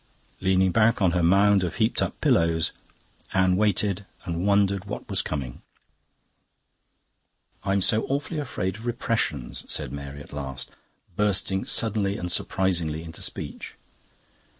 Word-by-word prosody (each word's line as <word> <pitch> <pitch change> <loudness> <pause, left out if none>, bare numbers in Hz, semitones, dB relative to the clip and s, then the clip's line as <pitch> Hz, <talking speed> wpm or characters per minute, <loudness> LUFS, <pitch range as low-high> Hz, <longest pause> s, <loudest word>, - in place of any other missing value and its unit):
Leaning 95 0 +3
back 115 +4 +3
on 95 -4 +3
her 90 0 +1
mound 100 +3 +5
of 90 - -2
heaped - - +1
up - - -2
pillows, 85 -1 +2 0.6
Anne 95 -1 +4
waited 100 -1 +2 0.2
and 85 +1 -2
wondered 100 -1 +2
what 105 - -6
was - - +1
coming. 65 -5 -5 2.0
"I'm 100 0 +1
so 110 +3 +3
awfully 145 +3 -2
afraid 95 -9 -3
of 115 +2 -8
repressions," 80 - -2
said - - -3
Mary 70 0 -7
at - - -15
last, 65 -3 -6 0.4
bursting 95 -1 +1
suddenly 105 -3 +1
and 90 0 -3
surprisingly 85 -4 0
into 80 -1 -9
speech. - - -3
95 Hz, 130 wpm, -25 LUFS, 85-105 Hz, 2.0 s, mound